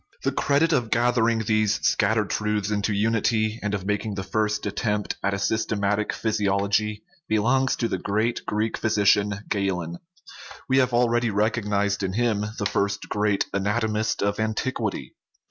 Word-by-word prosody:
The - - +1
credit 150 +4 +2
of 125 -6 +1
gathering 115 -1 +2
these 110 -1 +2
scattered 110 0 +2
truths 105 -1 -1
into 105 0 0
unity, 110 +1 +1
and 105 0 -1
of 95 -2 -5
making 105 +1 -2
the 95 - -3
first 105 0 -1
attempt 105 0 -1
at 100 0 0
a - - -2
systematic 105 0 0
physiology, 105 0 0 0.2
belongs 125 +5 +2
to 115 - -1
the 95 - -2
great 110 +5 -1
Greek 110 +1 -1
physician 105 -1 +2
Galen; 90 -4 -2 0.7
we 130 0 +3
have 130 -1 +2
already 120 -1 +2
recognized 105 -1 0
in 95 -1 -2
him 110 -2 +1
the 100 - -2
first 100 0 -1
great 105 -1 +1
anatomist 105 +2 0
of 100 +1 0
antiquity 110 - -2
(cf. - - -46
105 Hz, 150 wpm, -24 LUFS, 100-115 Hz, 0.7 s, we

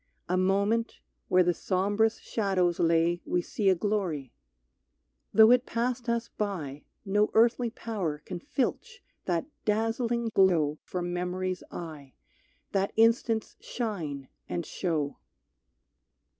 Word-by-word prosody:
A 180 - +1
moment, 200 +5 +1 0.3
where 185 0 +5
the 175 0 +2
sombrous 205 +6 +1
shadows 185 -5 0
lay 170 +1 +2
We 180 - 0
see 200 +1 0
a 190 - +5
glory. 175 - -2 1.0
Though 220 +1 +7
it 250 +1 +4
passed 240 +1 -1
us 235 0 0
by 160 -9 -3 0.2
No 210 +2 +2
earthly 235 +1 +4
power 205 -10 -3
can 180 -2 -5
filch 380 - -3 0.2
that 170 -3 0 0.2
dazzling 225 +2 0
glow 160 -6 +3
From 175 -1 -4
memory's 180 +1 -2
eye, 155 -5 -8 0.6
that 195 0 0
instant's 225 0 +2
shine 160 - -4 0.2
and 170 -2 -2
show. 155 -6 -2
195 Hz, 115 wpm, -28 LUFS, 175-225 Hz, 1.0 s, Though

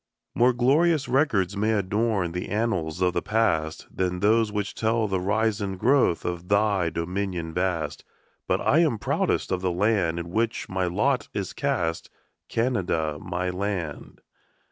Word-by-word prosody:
More 125 +2 +4
glorious 145 +5 +2
records 110 - +1
may 110 +2 +1
adorn 100 -2 0
The 90 +1 -4
annals 95 -7 -1
of 90 -1 +2
the 85 - 0
past 80 -8 0
Than 90 -1 -1
those 110 +2 +3
which 105 -1 -2
tell 110 0 0
the 95 -2 -1
rise 110 +3 0
and 95 -2 -3
growth 125 -5 +2
Of 90 0 -4
thy 100 -3 +2
dominion 90 0 -3
vast; 85 -5 -2 0.4
But - - +1
I 155 - +3
am 155 -9 +3
proudest 100 - 0
of 90 -1 0
the 95 - 0
land 90 -2 +1
In 85 0 -5
which 115 +3 -1
my 95 0 -1
lot 125 +9 0
is 100 -3 -3
cast, 85 -1 -1 0.4
Canada, 90 - 0
my 90 +1 -2
land. 90 -5 -4
95 Hz, 155 wpm, -25 LUFS, 90-110 Hz, 0.4 s, More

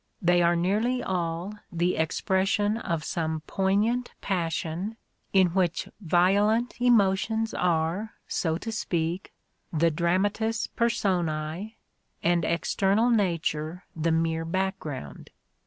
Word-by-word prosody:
They 175 -2 +3
are 170 0 +4
nearly 215 +9 +1
all 175 +1 -2 0.2
the 175 +1 +1
expression 190 +5 +1
of 165 -7 -2
some 160 -1 -2
poignant 205 +8 0
passion," 180 +3 -2 0.3
in 190 -2 +5
which 180 -1 0
violent 205 +7 +2
emotions 220 -1 +3
are, 175 +5 0
so 160 -2 0
to 225 +5 -5
speak, 175 -4 -2 0.4
the 165 +1 +2
dramatis 205 +7 0
personce^ 180 -3 -1 0.5
and 175 0 +3
external 195 +7 +2
nature 170 -5 0
the 165 +1 0
mere 165 0 +1
background. 165 - -4
180 Hz, 105 wpm, -27 LUFS, 165-205 Hz, 0.5 s, in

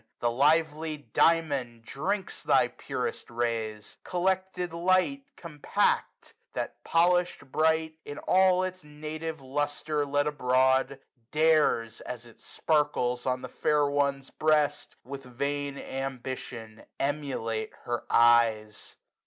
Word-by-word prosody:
The 120 - +1
Kvely 150 0 +1
Diamond 140 -8 +2
drinks 190 - -3
thy - - +3
purest 460 - -5
rays. 115 -3 -3
Collected 185 -1 -1
light, 185 +10 +2 0.2
compact; 150 -4 -1 0.2
that, - - -5
polishM 175 -4 +2
bright. 160 0 +1
And 145 - -8
all 185 0 +4
its 185 0 -4
native 155 +1 -6
lustre 145 +2 -1
let 145 +1 +1
abroad. 130 -1 +2 0.3
Dares, 150 -8 +2
as 120 -1 -7
it 115 - -17
sparkles 125 -6 0
on 130 0 -1
the - - -4
fair 150 -1 +1
one's 140 -1 0
breast, 155 -2 +1
145 135 0 -9
With 120 - -19
vain 140 0 -2
ambition 130 -5 -6 0.2
emulate 135 -6 -2
her 120 0 -3
eyes. 115 -3 +3
145 Hz, 110 wpm, -28 LUFS, 125-160 Hz, 0.3 s, all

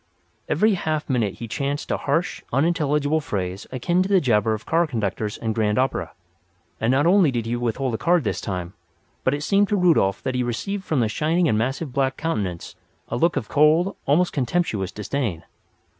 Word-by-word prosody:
Every 215 0 +3
half 155 -4 -2
minute 110 -6 0
he 115 - -7
chanted 140 +5 -3
a - - +1
harsh, 155 +5 -1
unintelligible 150 +1 +1
phrase 95 -6 -4
akin 170 +8 +1
to 190 - -1
the 195 -2 +5
jabber 110 -6 +2
of 110 - -10
car 165 +1 +2
conductors 105 -4 -2
and 110 -1 -2
grand 105 -1 +1
opera. 130 +1 -1 0.7
And 115 - 0
not 135 +4 +3
only 180 -2 +5
did 120 -4 -2
he 115 +1 -1
withhold 120 +2 -1
a 110 - -2
card 175 -2 +3
this 110 - -2
time, 90 -2 -4 0.5
but 130 - +2
it 145 - -5
seemed 200 +3 +3
to 210 - +2
Rudolf 160 - +3
that 130 - -1
he 125 - 0
received 190 - -3
from 150 -5 +1
the 115 - +2
shining 160 +9 +1
and 110 - +2
massive 130 +5 -2
black 135 0 0
countenance 100 - -3 0.3
a - - -2
look 170 +7 +2
of 110 - -2
cold, 155 +6 +3
almost 170 +6 +3
contemptuous 125 - -1
disdain. 105 - -3
135 Hz, 190 wpm, -23 LUFS, 110-165 Hz, 0.7 s, the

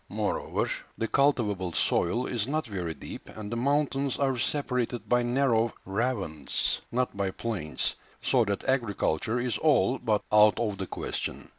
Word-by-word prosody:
Moreover, - - -1 0.3
the 115 - -1
cultivable 105 -10 +1
soil 115 +11 +1
is 115 -3 -1
not 155 +3 -1
very 90 -8 -4
deep, - - -9
and 105 -1 -7
the - - -1
mountains 140 +1 +1
are 135 -2 +1
separated 125 0 -1
by 125 0 +3
narrow 120 -2 +2
ravines, 95 - -1
not 125 -1 0
by 100 -1 0
plains, 95 -6 -2 0.3
so 125 -3 +3
that 100 -1 -3
agriculture 115 -4 0
is 120 -1 -1
all 135 -5 +3
but 110 -4 +1
out 105 -2 +6
of 105 -4 -1
the 95 - -3
question. - - -4
115 Hz, 150 wpm, -28 LUFS, 100-130 Hz, 0.3 s, out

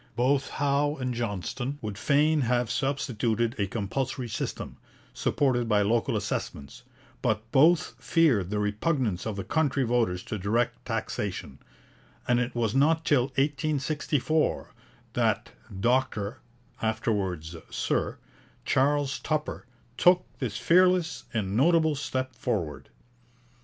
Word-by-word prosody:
Both 135 +3 +2
Howe 145 +1 +1
and 125 -3 -3
Johnston 120 +4 -3
would 105 -2 -4
fain 150 +6 +3
have 120 -2 +1
substituted 120 -4 0
a 100 - +1
compulsory 120 +5 -3
system, 105 - -4 0.4
supported 125 -4 +1
by 105 -1 +4
local 115 +3 +1
assessments, 70 -1 -4 0.4
but 110 0 0
both 160 +5 +4
feared 135 - +2
the 105 - -1
repugnance 105 - 0
of 110 - -3
the 100 - -4
country 145 -4 +1
voters 115 -7 +1
to 110 - -5
direct 115 +5 0
taxation, 70 +1 -4 0.7
and 120 0 +3
it 125 0 -2
was 115 -3 0
not 160 +4 +3
till 130 -5 +4
1864 145 +2 0 0.4
that - - 0 0.3
Dr 120 -1 0 0.4
(afterwards 100 -7 -1
Sir) - - -1 0.5
Charles 140 +1 +2
Tupper 155 -5 -3 0.3
took 180 0 +5
this 115 -7 -3
fearless 175 -7 +3
and 100 -3 -2
notable 160 +4 +4
step 130 -2 -3
forward. 80 - -3
125 Hz, 115 wpm, -27 LUFS, 110-145 Hz, 0.7 s, took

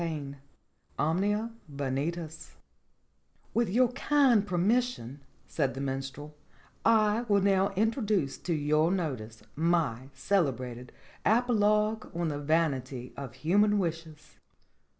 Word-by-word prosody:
V 150 -4 -4 0.6
OMNIA 205 +8 0 0.2
VANITAS 145 +4 -4 1.0
"WITH 235 -3 +1
your 245 +5 +3
kind 255 -5 +3
permission," 185 - 0 0.3
said 140 -4 -1
the - - -5
Minstrel, 135 +2 -5 0.5
"I 220 -1 +4
will 200 -1 +4
now 195 0 +3
introduce 210 - 0
to 175 - -2
your 155 +2 +2
notice 130 - -3
my 150 -6 0
celebrated 125 - -1 0.3
apologue 215 -1 +2
on 170 -1 -1
the 145 -1 -3
vanity 140 -5 -1
of 130 -4 -7
human 205 +9 +3
wishes." 165 -4 -5
165 Hz, 105 wpm, -29 LUFS, 140-210 Hz, 1.0 s, I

